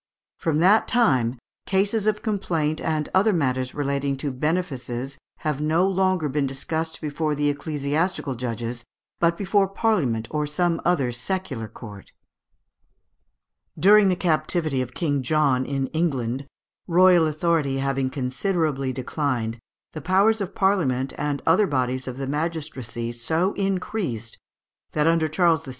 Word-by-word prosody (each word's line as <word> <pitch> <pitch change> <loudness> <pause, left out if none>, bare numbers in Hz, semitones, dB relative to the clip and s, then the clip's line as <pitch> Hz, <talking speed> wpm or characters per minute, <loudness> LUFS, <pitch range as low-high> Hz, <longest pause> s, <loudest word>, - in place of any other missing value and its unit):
From 160 -2 0
that 200 +5 +5
time 130 - +2 0.3
"cases 200 +2 +1
of 210 -1 0
complaint 165 -8 -1
and 155 -2 -1
other 200 +4 +4
matters 130 -7 -1
relating 140 -1 -1
to 140 +1 -3
benefices 135 -3 -3 0.2
have 150 -2 -1
no 160 +5 +2
longer 185 -4 +1
been 140 0 0
discussed 160 +4 -3
before 150 0 -1
the 145 0 +1
ecclesiastical 145 +2 -1
judges, 120 -1 -4 0.4
but 170 0 +2
before 200 0 +2
Parliament 160 - 0
or 150 -1 -1
some 170 +3 0
other 140 -9 +1
secular 120 - -3
court." 105 -3 -11 1.6
During 205 +1 +6
the 185 - +2
captivity 155 -4 0
of 130 0 -6
King 145 -6 0
John 135 -2 +2
in 135 -1 -1
England, 135 -5 -1 0.4
royal 175 -2 +5
authority 155 -3 0
having 135 -1 0
considerably 135 +1 -1
declined, 125 -3 -2 0.3
the 155 - -6
powers 200 +5 +3
of 195 0 -4
Parliament 140 -10 +1
and 145 -1 -2
other 210 -2 +4
bodies 130 -2 -1
of 130 0 -5
the 135 - -3
magistracy 145 -6 -3
so 160 - 0
increased, 185 - -3 0.5
that 150 -1 +2
under 165 -1 +3
Charles 165 0 +2
VI. - - -10
150 Hz, 135 wpm, -24 LUFS, 130-180 Hz, 1.6 s, During